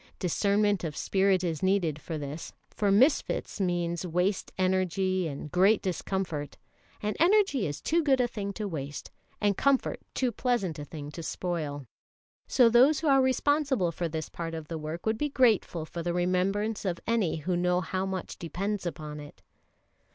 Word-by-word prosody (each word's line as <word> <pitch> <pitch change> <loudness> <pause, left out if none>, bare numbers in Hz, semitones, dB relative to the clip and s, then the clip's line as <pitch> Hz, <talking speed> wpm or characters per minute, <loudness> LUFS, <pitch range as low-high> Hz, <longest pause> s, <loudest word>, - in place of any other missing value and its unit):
Discernment 200 +2 +1
of 155 -3 -4
spirit 190 -1 +2
is 165 -4 -2
needed 180 -6 +1
for 160 - -5
this, 145 +2 -6 0.2
for 205 -2 +1
misfits 245 -1 +2
means 175 -2 -1
waste 180 +3 0
energy 185 -1 +1
and 145 0 -6
great 195 +5 +4
discomfort; 175 -5 -3 0.5
and 210 0 -1
energy 350 - +4
is 145 - -4
too 335 +2 +2
good 275 -4 +3
a 250 - +3
thing 205 -4 -4
to 210 0 -4
waste, 145 -5 -6 0.3
and 205 -1 +2
comfort 275 +3 +1 0.2
too 255 -2 +1
pleasant 220 - -1
a 145 - -6
thing 145 -1 -8
to 165 - -7
spoil. 155 -5 -3 0.6
So 245 - +5
those 255 +7 +5
who 325 - -1
are 270 -1 +6
responsible 265 - +2
for 170 +1 -3
this 160 -1 -4
part 165 -1 -5
of 160 -2 -7
the 165 -1 -4
work 155 +3 -6
would 220 0 0
be 295 - 0
grateful 220 - +2
for 170 +1 -6
the 175 +1 -2
remembrance 190 +4 0
of 180 -4 -2
any 225 -8 +1
who 165 +3 -2
know 180 0 +2
how 185 +2 -2
much 190 -2 -5
depends 190 +3 -3
upon 150 -2 -6
it. 145 0 -12
185 Hz, 175 wpm, -28 LUFS, 165-215 Hz, 0.6 s, are